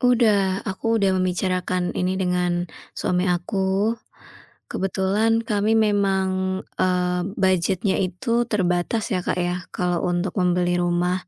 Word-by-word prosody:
Udah. 215 -6 +3
Aku 225 +3 -1
udah 195 -1 +3
membicarakan 185 0 -1
ini 185 +1 0
dengan 180 -1 0 0.3
suami 180 -1 0
aku. 190 +4 0 0.8
Kebetulan 205 +4 +1
kami 215 0 +1
memang, 190 -3 +1 0.2
eee, 180 -1 +1
budget-nya 190 +1 +1
itu 230 +6 0
terbatas, 195 +2 0
ya, 185 - +1
Kak, 180 - -2
ya, 180 0 -2
kalau 180 -1 0
untuk 175 +1 -1
membeli 180 0 +2
rumah. 175 +1 0
185 Hz, 115 wpm, -23 LUFS, 180-200 Hz, 0.8 s, Udah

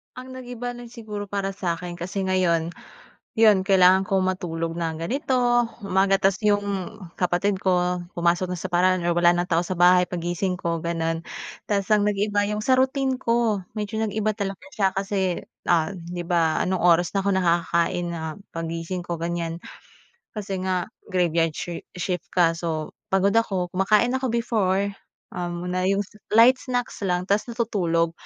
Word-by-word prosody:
Ang 255 +1 -9
nag-iba 245 -1 -6
lang 240 0 -11
siguro 210 -3 -6
para 200 -1 -2
sa 180 -3 -1
akin 175 +1 -7
kasi 185 +3 -4
ngayon, 180 -3 +1 0.7
Iyon 215 -4 +6
kailangan 190 -1 +5
kong 190 0 +1
matulog 165 -2 -4
na 165 -1 -1
ganito, 245 - +1 0.2
umaga. 195 0 +3
Tapos 195 0 +3
Iyong 205 -1 0 0.2
kapatid 185 +2 +1
ko 180 -1 +1 0.2
pumasok 175 +1 +1
na - - -4
sa - - -7
paaralan 185 +1 +3
or 175 - +2
wala 175 0 +6
ng 175 0 0
tao 165 0 +3
sa 185 - -2
bahay 180 0 +6
pag-gising 180 +1 -2
ko, 170 -1 -2
ganoon. 165 -1 -1 0.5
Tapos 200 -2 0
ang 210 -1 +4
nag-iba 205 0 +1
Iyong 210 +1 -2
sa 260 -1 +4
routine 265 0 +1
ko, 230 -4 +1 0.2
medyo 210 +1 -3
nag-iba 215 0 0
talaga 195 -2 -4
siya 195 -3 +2
kasi, 195 -2 -1 0.3
ah, 170 +3 +3
'di 175 0 -6
ba 165 -2 +2
anong 185 -1 -1
oras 175 0 +4
na 195 - +1
ako 200 - 0
nakakakain 170 -1 +1
na 170 - -4 0.3
pag-gising 165 +2 -4
ko 170 - -3
ganyan. 170 -1 -2 0.8
Kasi 200 -2 -4
nga 185 -1 -1 0.2
graveyard 170 -3 +2
shi 175 -2 -5
shift 180 0 -3
ka. 170 -2 +4
So 160 -2 -3 0.2
pagod 195 +1 +3
ako 190 -6 +1
kumakain 210 +5 +3
ako 260 - -1
before, 200 -4 0 0.4
um, 175 0 -4
na 185 +1 0
iyong 195 +1 +2 0.3
light 250 +3 +7
snacks 250 -2 -3
lang 180 0 0
tapos 200 +4 0
natutulog. 190 -9 0
185 Hz, 165 wpm, -24 LUFS, 175-205 Hz, 0.8 s, light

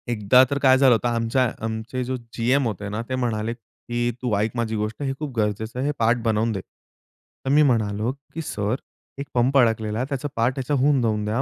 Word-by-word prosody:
एकदा 120 +2 +5
तर 140 - 0
काय 130 -1 +5
झालं 130 -2 +6
होतं 120 +1 +1
आमच्या 120 +1 +1
आमचे 110 +3 -3
जो 130 +1 -2 0.2
जीएम 125 +3 +2
होते 105 -1 -4
ना 105 +2 -3
ते 130 - -1
म्हणाले, 115 -3 -1
की 120 +1 -4
"तू 125 -3 -1
ऐक 110 +2 0
माझी 115 -2 -1
गोष्ट 105 +4 -3
हे 135 -1 -1
खूप 150 -2 -4
गरजेचं 110 +3 -1
आहे 130 - -1
हे - - +2
पार्ट 115 +1 +3
बनवून 110 0 +1
दे." 100 -3 -3
तर 130 - -14
मी 150 +2 +5
म्हणालो, 110 -3 +1 0.2
"की 165 - -4
सर 105 -6 -2 0.4
एक 140 - -5
पंप 125 +2 +3
अडकलेला 110 -3 +2
आहे, 125 - 0
त्याचा 140 0 -2
पार्ट 115 +3 +2
ह्याचा 135 +2 -2
होऊन 140 -1 +3
जाऊन 105 -2 0
द्या, 110 +5 0
120 Hz, 215 wpm, -23 LUFS, 110-130 Hz, 0.4 s, झालं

